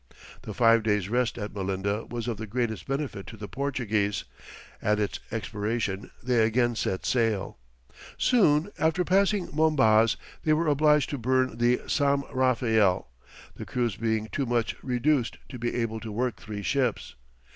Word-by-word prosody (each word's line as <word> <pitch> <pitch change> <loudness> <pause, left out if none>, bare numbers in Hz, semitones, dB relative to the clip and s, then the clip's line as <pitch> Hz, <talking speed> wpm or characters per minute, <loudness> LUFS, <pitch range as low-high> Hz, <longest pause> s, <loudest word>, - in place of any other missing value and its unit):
The - - -7
five 115 -1 +5
days' 105 -3 0
rest 120 0 0
at 105 -2 -5
Melinda 100 +2 -2
was 120 -1 -4
of 115 -3 -2
the 110 +1 -6
greatest 115 0 -2
benefit 135 -8 -3
to 110 - -9
the 105 -1 -7
Portuguese, 110 -5 -1 0.6
at 105 0 +1
its 105 - -2
expiration 105 -2 -3
they 120 -2 +3
again 120 +2 +2
set 95 -3 -2
sail. 110 - 0 0.6
Soon 190 -7 +3
after 160 +3 +2
passing 195 +1 +2
Mombaz 130 -8 +4 0.3
they 155 - +3
were 160 +2 +1
obliged 150 -1 +3
to 145 - -3
burn 130 0 +1
the 120 +1 +3
Sam 140 -1 +1
Raphael, 115 - +2 0.5
the - - -7
crews 120 -4 -1
being 110 -1 -1
too 140 -2 -1
much 120 -1 0
reduced 125 0 0
to 125 - -8
be 120 +1 -2
able 115 -2 -2
to 110 0 -7
work 120 0 -1
three 105 -1 -7
ships. 130 -1 -1
120 Hz, 155 wpm, -27 LUFS, 110-135 Hz, 0.6 s, five